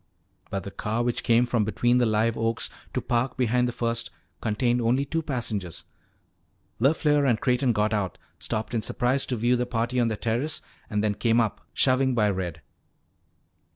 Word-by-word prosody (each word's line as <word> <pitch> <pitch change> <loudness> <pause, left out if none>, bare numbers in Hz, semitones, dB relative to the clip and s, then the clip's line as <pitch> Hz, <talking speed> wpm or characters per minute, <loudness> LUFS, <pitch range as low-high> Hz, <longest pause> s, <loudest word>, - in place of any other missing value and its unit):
But 100 -2 -3
the 100 - -7
car 110 +4 -2
which 120 -1 -1
came 120 +1 +4
from 120 -2 +1
between 120 +3 +2
the 120 - +3
live 110 +1 +2
oaks 115 0 -1 0.2
to - - +1
park 120 +1 -1
behind 125 0 +2
the - - -1
first 115 -1 -2 0.3
contained 120 +3 +1
only 125 +4 +2
two 160 +3 -1
passengers. 110 - -3 0.9
LeFleur 145 +2 +3
and 115 -3 +2
Creighton 125 0 +2
got 105 -1 +1
out, 100 -4 -1 0.2
stopped 110 +2 -3
in 115 - +1
surprise 125 +5 +1
to 125 - -1
view 120 +2 +2
the 125 0 -1
party 120 +1 -1
on 120 - +3
the 110 -2 -2
terrace, 120 +9 -2 0.3
and 105 -2 0
then 105 -1 +2
came 115 +2 +2
up, 115 -3 0
shoving 130 -1 +2
by 105 -3 +3
Red. 90 -4 -4
120 Hz, 180 wpm, -26 LUFS, 110-125 Hz, 0.9 s, came